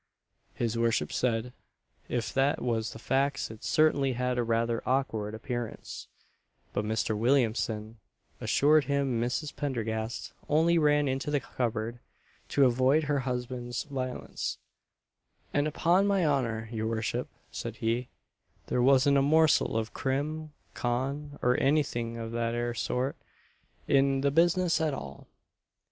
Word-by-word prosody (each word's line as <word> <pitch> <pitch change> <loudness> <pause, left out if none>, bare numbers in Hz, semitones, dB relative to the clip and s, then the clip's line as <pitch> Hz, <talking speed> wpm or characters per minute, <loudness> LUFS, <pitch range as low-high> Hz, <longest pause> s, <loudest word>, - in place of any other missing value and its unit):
His 115 -1 -1
worship 115 -1 +1
said 120 0 0 0.6
if 120 -3 -2
that 140 +4 +2
was 115 -3 -1
the - - -9
facts 135 +2 0
it 110 - -12
certainly 145 -4 +3
had 125 0 -1
a - - +2
rather 115 0 0
awkward 110 -5 -1
appearance; 120 +1 -5 0.7
but 100 - 0
Mr. 110 0 0
Williamson 115 -2 0 0.4
assured 150 +1 +4
him 140 -4 0
Mrs. 125 +5 -2
Pendergast 115 -5 -3 0.2
only 165 +3 +4
ran 145 -1 +3
into 135 +2 -1
the 145 -1 +2
cupboard 120 -2 -3 0.5
to 140 - +4
avoid 130 +5 +3
her 145 -1 +1
husband's 125 -1 -3
violence 130 -3 -4 1.0
"And 145 +1 +2
upon 175 +6 +3
my 195 -4 +2
honour, 115 -6 0
your 110 -1 -2
worship," 115 +2 -2 0.2
said - - -5
he, 115 +2 -1 0.6
"there 125 - 0
wasn't 140 +2 +5
a - - +3
morsel 155 -3 +4
of 110 0 -3
Crim. 150 +3 -2 0.2
Con., 140 +4 -2
or 125 +1 +3
anything 125 -5 +1
of 115 -1 -5
that 115 0 -1
'ere 120 0 -1
sort, 125 +4 -1 0.7
in 135 -1 +3
the 140 0 +2
business 170 +2 +3
at 155 -3 +1
all." 70 - -9
125 Hz, 135 wpm, -29 LUFS, 115-145 Hz, 1.0 s, wasn't